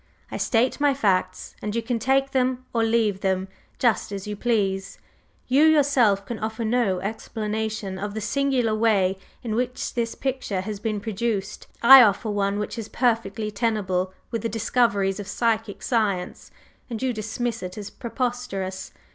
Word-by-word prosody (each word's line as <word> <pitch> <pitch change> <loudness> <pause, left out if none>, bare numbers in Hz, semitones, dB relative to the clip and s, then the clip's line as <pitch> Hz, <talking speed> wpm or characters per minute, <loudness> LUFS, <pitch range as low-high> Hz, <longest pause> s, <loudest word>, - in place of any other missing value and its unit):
I - - -3
state 245 +4 +1
my 285 -2 +3
facts, 195 -8 0
and 210 +1 -3
you 230 - -1
can 235 0 -1
take 270 +3 +2
them 255 -1 0
or 230 -1 +2
leave 225 -3 +2
them, 190 0 0 0.3
just 230 -3 +1
as 195 -1 -5
you 210 0 -4
please. 195 -4 -1 0.5
You 270 +4 +4
yourself 275 -10 +4
can 235 +2 -5
offer 220 +1 -3
no 220 -5 +1
explanation 215 -1 -3
of 205 +1 -4
the - - -2
singular 250 +1 +1
way 200 -4 +2 0.2
in 225 -3 -3
which 250 +2 -2
this 230 -1 -2
picture 260 -8 -2
has 205 +1 -5
been 215 -1 -2
produced; 210 -2 -3 0.2
I 265 +2 +11
offer 215 -1 +3
one 200 0 0
which 210 +2 -4
is 220 - -6
perfectly 225 -3 0
tenable 200 -4 0 0.2
with 230 - -2
the 230 - -2
discoveries 220 -3 +1
of 200 - -6
psychic 225 0 -1
science, 205 -7 -1 0.4
and 230 -2 -4
you 260 0 0
dismiss 225 +2 -3
it 180 +1 -6
as 205 -1 -6
preposterous. 235 -6 -4
220 Hz, 165 wpm, -24 LUFS, 200-240 Hz, 0.5 s, I